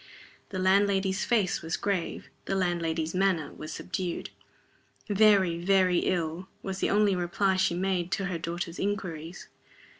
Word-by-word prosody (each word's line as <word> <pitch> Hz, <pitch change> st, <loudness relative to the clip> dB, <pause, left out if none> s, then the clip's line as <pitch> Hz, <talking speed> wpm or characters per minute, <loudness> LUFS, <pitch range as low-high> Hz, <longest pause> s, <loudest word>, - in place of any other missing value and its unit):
The 190 Hz, -, -5 dB
landlady's 190 Hz, 0 st, +2 dB
face 205 Hz, -6 st, +1 dB
was 165 Hz, +1 st, -2 dB
grave, 195 Hz, -4 st, -2 dB, 0.2 s
the 195 Hz, -, -1 dB
landlady's 165 Hz, -3 st, -1 dB
manner 185 Hz, -5 st, +1 dB
was 155 Hz, 0 st, -8 dB
subdued. 180 Hz, +1 st, -4 dB, 0.8 s
"Very, 200 Hz, -5 st, +4 dB
very 185 Hz, -1 st, +4 dB
ill," 175 Hz, 0 st, -1 dB, 0.2 s
was 190 Hz, 0 st, -4 dB
the -, -, +1 dB
only 205 Hz, -1 st, +3 dB
reply 185 Hz, +2 st, +1 dB
she 185 Hz, -2 st, +2 dB
made 185 Hz, -1 st, -1 dB
to 195 Hz, -, -1 dB
her 180 Hz, -3 st, -3 dB
daughter's 170 Hz, +1 st, -4 dB
inquiries. 180 Hz, -4 st, -4 dB
185 Hz, 140 wpm, -28 LUFS, 170-195 Hz, 0.8 s, Very